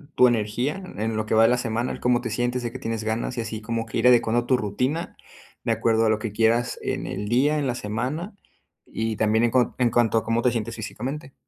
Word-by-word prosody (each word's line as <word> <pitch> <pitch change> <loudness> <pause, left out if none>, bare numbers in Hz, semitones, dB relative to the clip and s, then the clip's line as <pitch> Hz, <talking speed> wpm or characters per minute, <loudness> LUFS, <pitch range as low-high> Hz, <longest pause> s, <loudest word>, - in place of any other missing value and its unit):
tu 125 - +7
energía 120 - -1
en 110 +2 -1
lo 110 0 -1
que 110 - 0
va 110 - +6
de 115 - +6
la 125 - +3
semana, 115 0 -2
¿cómo 125 0 +2
te 120 - -4
sientes?, 120 +3 -1
¿de 120 - -3
qué 130 - -8
tienes 115 -3 -3
ganas?, 115 +3 -2
y - - 0
así 110 -1 -5
como 115 +1 -3
que 110 - -5
ir 120 - +4
adecuando 120 -1 +4
tu 130 +1 +3
rutina 125 - -2 0.5
de - - 0
acuerdo 115 0 +2
a - - +3
lo 110 0 +1
que 110 0 -4
quieras 115 +3 +2
en - - -3
el 105 0 -4
día, 145 +6 +3
en 140 - -1
la 125 - -1
semana 125 - -4 0.5
y 110 0 -3
también 110 +2 +2
en 120 - 0
cuan 125 0 +2
en 120 -2 +2
cuanto 115 -1 +3
a 110 - +1
cómo 115 +1 0
te 125 - +3
sientes 115 0 -3
físicamente. 130 +6 -6
115 Hz, 245 wpm, -24 LUFS, 110-125 Hz, 0.5 s, tu